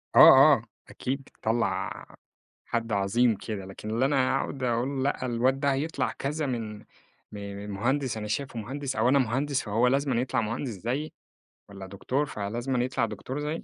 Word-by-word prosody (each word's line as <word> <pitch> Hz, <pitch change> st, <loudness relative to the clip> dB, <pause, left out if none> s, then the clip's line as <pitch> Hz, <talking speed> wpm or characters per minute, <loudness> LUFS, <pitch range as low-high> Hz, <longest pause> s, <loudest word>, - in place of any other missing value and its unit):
آه، -, -, +7 dB, 0.3 s
آه، -, -, +1 dB, 0.3 s
أكيد 135 Hz, +2 st, -3 dB
بتطلّع 115 Hz, -1 st, -2 dB, 0.6 s
حد 115 Hz, -1 st, -2 dB
عظيم 105 Hz, +4 st, +2 dB
كده. 100 Hz, -1 st, -6 dB
لكن 95 Hz, +3 st, -8 dB
اللي 120 Hz, +4 st, +2 dB
أنا 135 Hz, -2 st, +2 dB
هاقعد 135 Hz, -1 st, -3 dB
أقول 125 Hz, +3 st, 0 dB
لأ، 140 Hz, -2 st, -1 dB
الواد 125 Hz, +2 st, +1 dB
ده 140 Hz, -1 st, +2 dB
هيطلع 140 Hz, -2 st, -1 dB
كذا 150 Hz, +2 st, -2 dB
من 115 Hz, -5 st, -3 dB
م -, -, -18 dB, 0.5 s
م 100 Hz, 0 st, -6 dB
مهندس 130 Hz, +4 st, 0 dB
أنا 105 Hz, 0 st, -4 dB
شايفه 120 Hz, +2 st, -3 dB
مهندس 135 Hz, +4 st, -4 dB
أو 125 Hz, -, +3 dB
أنا 140 Hz, -, +5 dB
مهندس، 135 Hz, +3 st, 0 dB
فهو 115 Hz, +4 st, +1 dB
لازمًا 135 Hz, -2 st, +1 dB
يطلَع 125 Hz, -2 st, 0 dB
مهندس 115 Hz, +5 st, -3 dB
زيي 120 Hz, -, -3 dB, 0.6 s
والّا 95 Hz, -1 st, -9 dB
دكتور 125 Hz, +9 st, -1 dB
فلازمًا 120 Hz, +2 st, -2 dB
يطلَع 125 Hz, -2 st, 0 dB
دكتور 115 Hz, +6 st, -5 dB
زيي، 150 Hz, +2 st, -3 dB
125 Hz, 165 wpm, -27 LUFS, 110-135 Hz, 0.6 s, آه